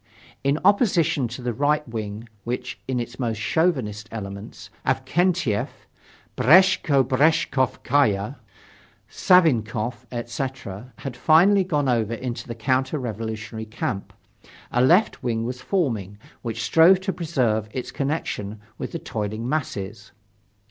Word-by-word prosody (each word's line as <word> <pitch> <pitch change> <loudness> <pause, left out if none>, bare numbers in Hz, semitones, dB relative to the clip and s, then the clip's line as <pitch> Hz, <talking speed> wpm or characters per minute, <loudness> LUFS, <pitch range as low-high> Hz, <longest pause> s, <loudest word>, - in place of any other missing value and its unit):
In 140 +2 +2
opposition 170 - +3
to 120 +2 -8
the 120 -1 -1
right 150 +3 +1
wing 110 -1 -5 0.2
which, 125 +1 -4
in 130 -2 -1
its 120 - -6
most 115 -4 -1
chauvinistic 110 - 0
elements, 100 -1 -8
such - - +2
as - - -16
Avksentyef, 170 - +1 0.7
Breshko 165 -2 +5
Breshkovskaya, 130 -4 +1 0.7
Savinkoff, 120 - +2
etc., 120 -2 -5
had 135 -3 -6
finally 175 +9 +5
gone 150 -6 0
over 115 -2 +1
into 120 0 -5
the 115 - -5
counter 130 +5 0
revolutionary 110 -2 -5
camp, 105 -2 -4 0.6
a 120 - +3
left 180 +11 +4
wing 115 -3 -1
was 125 +1 -5
forming, 115 - -1 0.2
which 115 -1 -4
strove 170 +3 +6
to 190 0 -2
preserve 125 - 0
its 125 +1 -5
connection 125 -8 -3 0.2
with - - -5
the - - -1
toiling 110 -1 -4
masses. 105 -8 -4
125 Hz, 125 wpm, -24 LUFS, 110-150 Hz, 0.7 s, strove